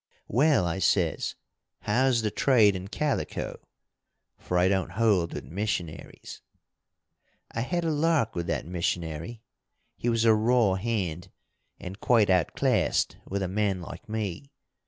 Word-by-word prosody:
'Well,' 135 - +3
I 85 +2 -2
says, 90 -4 +1 0.5
'how's 120 +2 +2
the 105 - 0
trade 110 -7 +4
in 95 +1 -6
calico?' 145 +7 -3 0.8
for 90 - -2
I 90 +1 +4
don't 95 -1 0
hold 100 -6 +2
with - - -5
missionaries. 90 -3 -5 1.1
"I 115 - -3
had 175 +8 -1
a 160 - +1
lark 150 -6 +1
with 85 -1 -3
that - - -2
missionary. 85 +4 -3 0.5
He 120 - -2
was 115 -1 +1
a 110 - +6
raw 110 -1 +3
hand, 95 -5 -2 0.5
and 95 +3 -8
quite 110 -5 +3
outclassed 90 -4 +1
with 100 0 -2
a - - -1
man 100 0 0
like 115 +7 -10
me. 110 +3 -4
105 Hz, 135 wpm, -27 LUFS, 90-115 Hz, 1.1 s, a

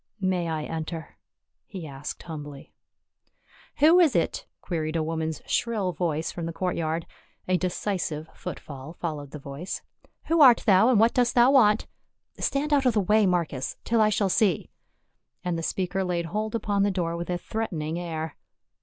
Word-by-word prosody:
" - - -46
May 185 -3 0
I 160 -2 -2
enter?" 160 +1 -6 0.5
he 185 -7 -7
asked 140 0 -7
humbly. 150 -4 -8 1.0
"Who 320 +5 +6
is 330 -6 +4
it?" - - 0
queried 160 -2 -3
a 160 - +1
woman's 160 0 -3
shrill 215 -6 0
voice 165 -3 -1
from 170 -2 -5
the - - -3
courtyard; 165 -2 -1 0.4
a 185 - +3
decisive 180 -4 -2
footfall 140 +2 -8
followed 155 -5 -5
the 150 - -8
voice. 140 +5 -6 0.2
" - - -33
Who 330 -1 +3
art 250 -4 +8
thou, 200 +3 +6
and 240 -5 +4
what 225 +2 +5
dost 245 -1 +2
thou 245 +2 +6
want? 220 -6 +5 0.5
Stand 295 +2 0
out 275 -2 +4
of 240 - +2
the - - +4
way, 210 +1 +3
Marcus, 170 -7 -1
till 230 -1 +2
I 215 - +5
shall 205 -1 +1
see," 190 -3 +1 0.7
and 180 -1 -1
the 165 - -2
speaker 190 +3 -1
laid 175 -2 -1
hold 215 +6 -3
upon 205 -3 0
the 200 - +3
door 175 -3 -1
with 170 +1 -5
a 175 - 0
threatening 170 -6 -3
air. 160 -3 -4
180 Hz, 175 wpm, -26 LUFS, 160-215 Hz, 1.0 s, art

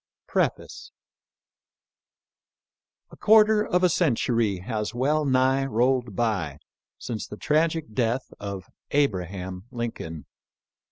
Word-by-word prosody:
>P]^EE^6E - - +3
4 - - -12 2.2
A - - -13
QUARTER 215 0 +5
of 180 +1 +1
a - - +7
century 115 - +1
has 105 +3 -4
well 150 +5 +1
nigh 130 0 +3
rolled 125 -3 +1
by 100 -11 -1 0.4
since 110 -3 -5
the 105 - -9
tragic 155 -4 0
death 120 +2 -1
of 100 -2 -6 0.2
Abraham 95 - -1
Lincoln. 115 -10 -5
120 Hz, 105 wpm, -25 LUFS, 100-140 Hz, 2.2 s, a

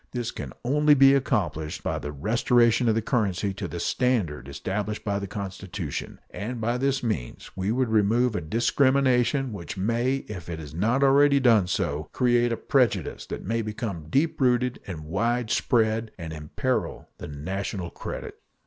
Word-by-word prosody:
This 120 -2 -2
can - - -7
only 150 +3 +4
be 135 0 +7
accomplished 95 - -1
by - - -1
the 75 - -5
restoration 115 - +2
of 110 - +2
the 115 - 0
currency 100 -5 0
to 95 - -5
the 85 - -6
standard 90 - 0
established 100 +9 -4
by 100 -1 0
the 100 - -5
Constitution, 95 -4 -5
and 120 +4 -5
by 120 +2 0
this 135 0 0
means 80 - -4
we 95 +2 -1
would 130 +2 +1
remove 110 +2 +2
a - - -1
discrimination 130 - +2
which 85 -1 -7
may, 120 +7 0
if 90 -5 -7
it 85 - -4
has 75 -2 -9
not 115 - +1
already 140 +1 +5
done 115 -8 +4
so, 75 -4 -2
create 120 -1 +2
a 115 - -1
prejudice 115 - 0
that - - -6
may 115 +3 0
become 105 -7 -5
deep 145 - +1
rooted 125 -1 +2
and 90 -5 -6
widespread 110 - 0
and 80 -3 -6
imperil 75 -1 -3
the - - -7
national 90 +4 -4
credit. - - -7
110 Hz, 165 wpm, -26 LUFS, 95-125 Hz, -, be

